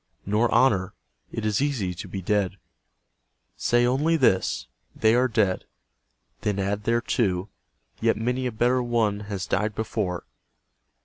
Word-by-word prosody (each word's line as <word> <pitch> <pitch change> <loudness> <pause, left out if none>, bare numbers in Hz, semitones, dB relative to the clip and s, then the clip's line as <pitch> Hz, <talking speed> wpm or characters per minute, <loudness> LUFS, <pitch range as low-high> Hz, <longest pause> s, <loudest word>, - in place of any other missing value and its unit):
Nor 105 +4 +2
honour. 100 -8 +3 0.4
It 115 - -4
is 105 +1 +1
easy 125 -11 0
to 85 - -8
be 95 -2 -6
dead. 100 0 0 1.0
Say 120 0 +2
only 145 +7 +2
this, 110 -10 +2 0.2
" - - -47
They 110 0 +3
are 125 +2 +4
dead." 110 -6 +1 0.8
Then 105 -1 -1
add 100 +2 -2
thereto, 110 -5 0 0.3
" - - -36
Yet - - +2
many 125 +3 -1
a - - -2
better 120 +3 +2
one 115 -4 +1
has 95 -3 -3
died 105 0 -1
before." 105 -5 -2
110 Hz, 145 wpm, -25 LUFS, 100-120 Hz, 1.0 s, are